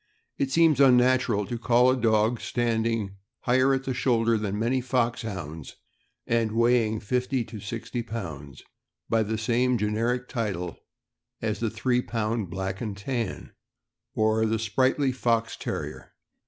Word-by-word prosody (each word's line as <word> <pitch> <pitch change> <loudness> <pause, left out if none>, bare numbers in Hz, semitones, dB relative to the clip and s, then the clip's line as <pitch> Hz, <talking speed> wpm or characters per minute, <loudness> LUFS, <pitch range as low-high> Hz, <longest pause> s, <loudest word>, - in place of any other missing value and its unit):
It 135 - +1
seems 160 -2 +4
unnatural 125 -4 +4
to 120 +3 -5
call 125 +2 +4
a - - +2
dog 110 -1 +2
standing 115 -4 -1 0.2
higher 130 +2 +3
at 135 0 +1
the 135 - -2
shoulder 115 -2 +2
than 105 -2 -2
many 120 +4 +1
Foxhounds, 110 - -3 0.5
and 115 -2 +1
weigh 115 0 +3
ing 110 0 -3
fifty 125 +3 -1
to 110 -1 -9
sixty 115 +4 -4
pounds, 80 -12 -7 0.5
by 115 - +3
the 110 +1 -1
same 120 +3 +1
generic 115 +4 -1
title 95 - -3 0.6
as 110 -2 -2
the 115 0 0
three 120 +3 0
pound 110 -4 -2
Black 95 +1 -4
and 105 -4 -4
Tan, 115 0 -4 0.6
or 110 0 +2
the 110 +1 +1
sprightly 130 +5 +1
Fox 115 -3 0
Terrier. - - -6
115 Hz, 140 wpm, -26 LUFS, 105-125 Hz, 0.6 s, seems